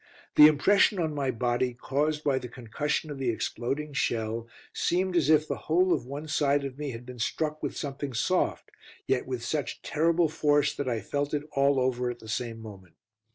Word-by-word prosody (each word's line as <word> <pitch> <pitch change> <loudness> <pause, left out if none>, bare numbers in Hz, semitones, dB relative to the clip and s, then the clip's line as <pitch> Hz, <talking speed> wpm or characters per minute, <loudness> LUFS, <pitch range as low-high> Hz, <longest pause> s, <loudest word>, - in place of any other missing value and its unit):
The 150 - +10
impression 190 +7 +4
on 160 -3 -1
my 140 -2 -1
body, 125 0 0
caused 150 +4 -1
by 135 -3 +2
the 125 - -7
concussion 140 +6 -3
of 140 - -6
the 130 -2 0
exploding 135 +6 -3
shell, 115 -3 -1 0.3
seemed 185 +1 0
as 155 -4 +3
if 155 -1 +4
the - - -2
whole 180 +3 +4
of - - -2
one 145 +3 -6
side 145 -1 +1
of 135 0 -7
me 150 -1 -3
had 120 -1 -7
been 125 -1 -10
struck 155 +6 -2
with - - -4
something 140 -1 -4
soft, 185 +10 0 0.3
yet 125 -2 0
with 125 -2 -4
such 150 +1 -3
terrible 165 +2 +2
force 145 -2 +2
that 140 -2 -3
I 115 -2 -1
felt 145 +1 -2
it 145 - -2
all 140 -1 +3
over 125 -1 0
at 120 - -5
the 110 - -14
same 115 0 -3
moment. 100 -6 -12
140 Hz, 200 wpm, -28 LUFS, 125-150 Hz, 0.3 s, The